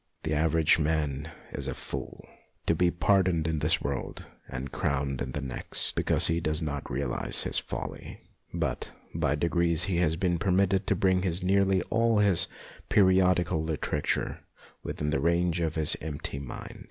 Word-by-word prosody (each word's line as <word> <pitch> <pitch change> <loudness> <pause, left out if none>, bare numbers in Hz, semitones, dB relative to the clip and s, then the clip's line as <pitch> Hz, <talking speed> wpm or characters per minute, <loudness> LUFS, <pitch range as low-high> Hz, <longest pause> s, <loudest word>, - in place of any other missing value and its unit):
The 80 - -1
average 80 +1 +3
man 75 -1 0 0.2
is - - -4
a - - -3
fool, - - -7 0.4
to - - +3
be 90 +2 +3
pardoned 90 -2 +2
in 80 -1 0
this 75 +3 +2
world 70 -2 -4 0.2
and 65 +1 -5
crowned 70 -1 -1
in 65 0 -3
the 75 - -3
next, 65 -2 -3
because - - +2
he 80 +1 +3
does 75 -1 -1
not 70 -3 -4
realize 70 -3 -1
his - - 0
folly; - - -6 0.3
but - - -3 0.2
by 70 - +1
degrees 85 +1 +2
he 90 -2 0
has 85 -2 +2
been 85 -1 0
per 100 - -1
mitted 95 +1 +2
to - - +3
bring 95 -1 +3 0.2
nearly 95 0 +3
all 115 0 +3
his 100 -4 +3 0.4
periodical 90 -3 +4
literature 75 -2 -1 0.4
within 75 0 -3
the 75 - +1
range 85 +1 +2
of 80 -2 -1
his 80 -2 +2
empty 75 -2 -5
mind. 70 -3 -8
80 Hz, 165 wpm, -28 LUFS, 75-90 Hz, 0.4 s, periodical